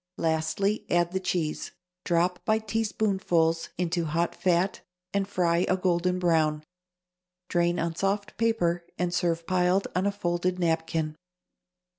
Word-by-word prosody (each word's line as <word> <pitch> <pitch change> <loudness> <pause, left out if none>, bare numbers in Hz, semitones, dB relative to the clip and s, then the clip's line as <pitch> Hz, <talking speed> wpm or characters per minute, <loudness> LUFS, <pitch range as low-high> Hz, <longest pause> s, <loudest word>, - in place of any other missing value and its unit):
Lastly, 160 +6 0
add 175 0 +2
the 190 - -1
cheese. 175 -4 -2 0.3
Drop, 175 +1 +1
by 215 0 +2
teaspoonfuls, 200 -7 0
into 170 -1 0
hot 165 +3 0
fat 180 +1 +1 0.3
and 200 -1 0
fry 170 -3 +1
a 185 - +3
golden 180 0 +1
brown. 160 -4 +2 0.9
Drain 175 0 +2
on 165 0 -1
soft 200 +4 -1
paper 175 -7 +1
and 175 -1 -1
serve 170 -1 0
piled 185 +2 +2
on 185 +2 +2
a - - +2
folded 180 -2 -1
napkin. 160 -2 -1
175 Hz, 130 wpm, -27 LUFS, 165-190 Hz, 0.9 s, a